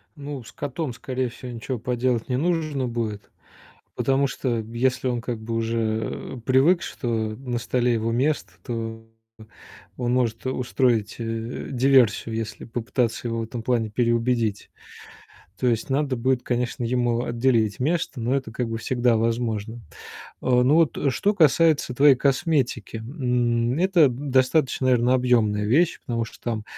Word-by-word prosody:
Ну, 140 -3 -7
с - - -13
котом, 145 -1 -4
скорее 130 +1 -3
всего, 125 +1 -9
ничего 120 +2 -4
поделать 125 0 -1
не 125 - +1
нужно 155 -4 0
будет, 115 -3 -4 0.7
потому 135 +1 +2
что 125 -3 -2
если 125 +4 -1
он 120 -2 -1
как 115 -1 -4
бы 115 +1 -4
уже, 115 0 -2
э, - - -10
привык, 140 +8 +4
что 135 - -6 0.3
на 125 -2 -4
столе 125 +1 +1
его 115 0 -1
место, 125 -6 0
то 115 -1 -5 0.9
он 120 -1 -1
может, 120 -2 0
э, 130 - 0
устроить, 120 -4 0
э, 115 +1 -4
диверсию, 125 -4 +3
если 110 -1 -5
попытаться 120 0 -2
его 115 0 -2
в - - -2
этом 115 +1 -6
плане 115 -2 0
переубедить. 115 -1 0 0.9
То 125 - +1
есть 115 +2 -1
надо 135 -1 0
будет, 125 +1 +1
конечно, 120 0 -2
ему 120 0 +1
отделить 115 -3 +1
место, 155 -1 -1
но 120 +3 0
это 135 -5 -4
как 120 0 -2
бы 115 0 -3
всегда 120 0 +1
возможно. 115 0 -1 0.6
Э, 125 -1 +3
ну, 130 +4 +4
вот 165 -3 +3 0.2
что 205 +10 +1
касается 160 -5 +3
твоей 140 +1 +6
косметики, 135 - 0
м, 120 0 0
это 180 -4 +5
достаточно, 130 +1 +1
наверное, 125 0 +3
объёмная 115 -5 +2
вещь, 160 +10 +2
потому 115 -1 -1
что 115 - -12
там 110 -3 -3
125 Hz, 150 wpm, -24 LUFS, 115-130 Hz, 0.9 s, твоей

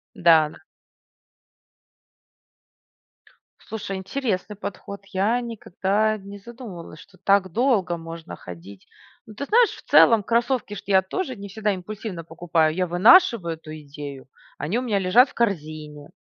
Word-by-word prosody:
Да, 160 -3 +5
да. - - -16 3.0
Слушай, 205 -3 -6
интересный 210 0 -3
подход, 200 0 -7
я 210 +6 +1
никогда 215 -2 -1
не 200 0 -10
задумывалась, 200 -8 -10
что 195 - -18
так 195 -1 +2
долго 215 -8 +1
можно 165 0 -9
ходить. 90 +2 -12 0.4
Ну, 215 - -12
ты 275 - -5
знаешь, 460 +8 +4
в - - -11
целом 230 -3 +6
кроссовки 235 0 0
ж - - -8
я 190 -1 +5
тоже 260 - -4
не 200 0 -8
всегда 210 +1 -1
импульсивно 190 -1 -6
покупаю, 160 -1 0
я 185 +1 0
вынашиваю 185 - +5
эту 155 -1 -11
идею, 140 -2 -9 0.3
они 165 - -1
у - - -2
меня 220 -5 0
лежат 205 +8 +4
в - - -20
корзине, 155 -8 -3
195 Hz, 135 wpm, -23 LUFS, 165-220 Hz, 3.0 s, целом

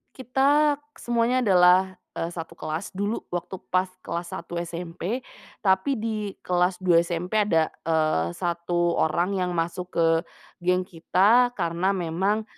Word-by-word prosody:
Kita 280 +4 +3 0.2
semuanya 240 +2 +1
adalah, 185 -2 +4 0.2
eee, 165 - -3
1 165 -1 -7
kelas 160 +2 -5
dulu 205 +4 -2
waktu 180 +2 -4 0.2
pas 185 0 +2 0.2
kelas 170 0 -4
satu 170 0 -5
SMP. 175 +7 -4 0.4
Tapi 190 +8 +2
di 215 -2 -3
kelas 180 +1 +1
dua 170 -2 +6
SMP 175 +5 -1
ada, 165 -6 +2
eee, 155 - 0
satu 175 0 0
orang 175 +4 +1
yang 180 -1 -1
masuk 175 +2 -2
ke 165 -1 +4 0.5
geng 180 +1 +1
kita 200 +8 +3
karena 175 +4 0
memang 190 +6 0
180 Hz, 135 wpm, -25 LUFS, 170-205 Hz, 0.5 s, dua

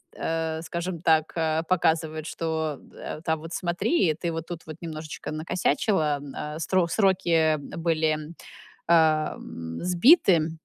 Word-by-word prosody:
э, 160 0 -2
скажем 170 0 -4
так, 160 -2 +3
э, 160 -1 0
показывает, 160 -3 +1
что 160 -3 -2
да, - - -8
э, - - -12
там, 160 -1 -1
вот 165 +2 -8
смотри, 175 - +1
ты 170 -2 -2
вот 165 0 -4
тут 170 -2 -6
вот 155 0 -8
немножечко 155 -2 -6
накосячила. 155 0 0
М, 140 -1 -9
а 150 +1 -5
сро 180 0 +1
сроки, 190 -1 +1
э, 160 -2 +4
были, 160 +1 0 0.7
эм, 155 - +1
сбиты, 180 - +5
160 Hz, 140 wpm, -26 LUFS, 155-170 Hz, 0.7 s, сбиты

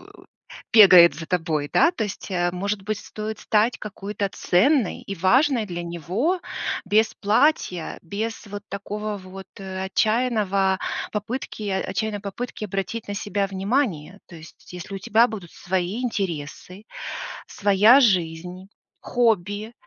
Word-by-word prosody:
у - - -17 0.5
бегает 185 -6 +9
за 165 -1 -8
тобой. 160 -5 -1
Да, 335 - +5
то 315 -11 -3
есть, 205 0 -6
э, 175 -1 +1
может 195 +3 -2
быть, 215 +1 -2
стоит 215 0 -6
стать 220 +2 +2
какой-то 205 0 -4
ценной 225 - +2
и 200 - -5
важной 240 - +3
для 175 -3 -5
него 185 - -1 0.4
без 215 +3 +3
платья, 205 - +1
без 215 +5 -5
вот 205 0 -7
такого 210 +1 -4
вот, 190 0 -11
э, 190 -1 -5
отчаянного 200 -3 +1 0.3
попытки 215 0 -4
отчаянной 200 +2 -2
попытки 215 +2 -5
обратить 195 +3 -4
на 205 - -4
себя 200 -1 -1
внимание. 195 - -1
То 175 - -12
есть 160 +2 -14
если 180 +2 -7
у 195 - -5
тебя 225 +5 +4
будут 200 -7 -8
свои 185 +5 -2
интересы, 185 -2 -4 0.6
своя 205 +6 +5
жизнь, 180 -3 0 0.3
хобби, 215 -2 0
200 Hz, 135 wpm, -23 LUFS, 185-220 Hz, 0.6 s, бегает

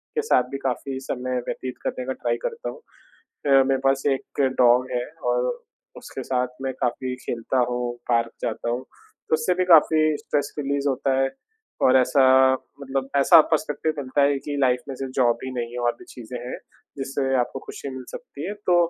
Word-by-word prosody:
के 455 - +2
साथ 445 - +3
भी 135 - -3
काफ़ी 130 +1 -3
समय 125 0 -2
व्यतीत 130 -1 -4
करने 125 - -3
का 130 - -2
ट्राई 470 - -1
करता 475 -1 -3
हूँ। - - -8 0.5
अ, 135 -2 +3
मेरे 135 0 +2
पास 135 0 +3
एक 135 - -9 0.2
डॉग 125 +1 +5
है 125 -1 0 0.3
और - - +1 0.4
उसके - - -7
साथ 125 -1 0 0.2
मैं 135 -1 -1
काफ़ी 125 +1 -1
खेलता 120 +1 -3
हूँ, 120 0 -2
पार्क 115 -1 +2
जाता 115 +1 -2
हूँ, 120 +1 -1 0.5
तो - - +3
उससे 180 +3 +1
भी 185 0 +1
काफ़ी 160 -2 +6 0.2
स्ट्रेस 145 - -2
रिलीज़ 140 0 0
होता 135 0 0
है। 135 0 +2 0.5
और 130 - +6
ऐसा 130 +1 +4 0.6
मतलब 135 -1 -3
ऐसा 160 +4 +8
पर्स्पेक्टिव 155 0 0
मिलता 140 +1 0
है 140 0 +3
कि 145 +1 -5
लाइफ़ 125 -2 +3
में 135 - -4
सिर्फ़ 130 0 -5
जॉब 120 -3 +3
ही 130 - -4
नहीं 120 -2 -4
है 125 - -5
और - - +2
भी - - -13
चीज़ें 125 0 -8
हैं - - -4 0.4
जिससे 135 0 -1
आपको 120 +2 -2
खुशी - - -7
मिल 130 -1 -7
सकती 145 +4 -8
है। 200 - -3
तो 180 - +4
135 Hz, 195 wpm, -24 LUFS, 125-145 Hz, 0.6 s, ऐसा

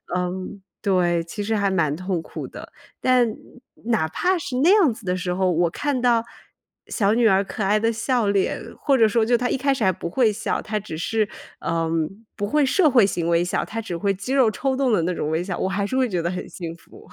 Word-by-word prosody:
嗯， 185 +2 -3 0.2
对， 175 -4 +2
其 170 +5 -6
实 220 +2 0
还 200 -1 +1
蛮 170 -6 +1
痛 185 0 -2
苦 - - -7
的。 - - -11 0.3
但 250 -3 +3 0.5
哪 220 -9 +1
怕 365 - +1
是 275 -6 -4
那 290 +7 +4
样 365 - +4
子 220 -1 -13
的 180 0 0
时 180 -1 -2
候， 185 0 +1
我 175 0 +2
看 280 - -2
到 235 -2 +3 0.6
小 205 -2 +1
女 235 +1 +2
儿 195 -3 +5
可 200 +2 -4
爱 205 +2 +3
的 225 +1 +1
笑 230 0 0
脸， 200 -1 0 0.2
或 275 -3 +3
者 225 -3 +5
说 220 +1 +2
就 240 +1 +3
她 245 +1 -1
一 - - +1
开 275 +1 +1
始 245 -6 -1
还 190 - +4
不 170 -1 -5
会 230 +4 +3
笑， 210 +1 -2
她 215 0 -3
只 195 -6 -6
是， 215 +5 0 0.4
嗯， 165 +5 -2
不 205 - -2
会 295 +7 +2
社 310 +3 +3
会 240 -5 +6
型 170 -3 -2
微 170 +1 +2
笑， 180 - -1
她 225 - -5
只 195 -6 -5
会 200 +3 0
肌 200 +7 -4
肉 260 -5 +4
抽 265 +4 -1
动 265 -2 +1
的 210 - +3
那 180 +2 0
种 150 - -3
微 160 +1 0
笑， 180 0 -4
我 190 - -1
还 200 +1 -1
是 260 - -3
会 260 -2 +2
觉 180 -4 -1
得 170 - -1
很 180 0 -5
幸 170 -2 -7
福。 170 - -17
205 Hz, 260 characters per minute, -23 LUFS, 180-240 Hz, 0.6 s, 会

